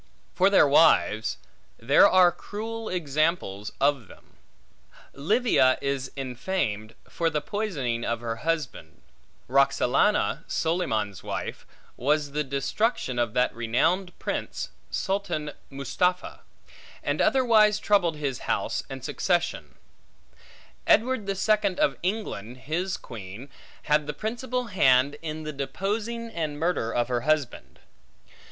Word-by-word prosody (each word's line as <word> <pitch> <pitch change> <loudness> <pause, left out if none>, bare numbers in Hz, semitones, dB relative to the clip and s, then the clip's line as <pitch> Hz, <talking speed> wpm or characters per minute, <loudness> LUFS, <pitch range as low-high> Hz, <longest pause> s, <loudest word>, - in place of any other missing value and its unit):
For 190 +2 +4
their 195 -7 +6
wives; 140 -7 +4 0.4
there 140 +11 +5
are 185 -1 +6
cruel 225 +4 -6
examples 155 - -1
of 140 -5 +1
them. - - -18 0.8
Livia 165 - +3
is 140 -1 -2
infamed, 125 - -3
for 165 -1 -1
the 150 -1 -1
poisoning 145 - -3
of 115 0 -1
her 115 -1 -4
husband; 145 - -4 0.4
Roxalana, 140 +8 +2
Solyman's 110 - -1
wife, - - -5 0.3
was 145 +2 +1
the 150 +1 -1
destruction 140 - -1
of 120 -2 -1
that 125 0 +2
renowned 125 +11 0
prince, - - -4 0.2
Sultan 185 -7 -2 0.2
Mustapha, 160 +7 -1 0.6
and - - 0
otherwise 220 -5 +4
troubled 195 -6 +2
his 140 -4 -3
house - - 0
and - - -7
succession; - - -1 1.1
Edward 245 -3 +3
the 195 - -1
Second 205 -1 +1
of 135 - +2
England, 175 - -3
his 175 +6 -2
queen, 110 +3 -10 0.3
had 150 0 +2
the 150 - -3
principal 245 - -3
hand 140 - +3
in 155 -1 -5
the 155 0 -5
deposing 210 +11 -3
and 155 -6 -3
murder 160 -9 0
of 120 0 0
her 120 -1 -1
husband. 150 -2 -1
150 Hz, 120 wpm, -26 LUFS, 130-195 Hz, 1.1 s, their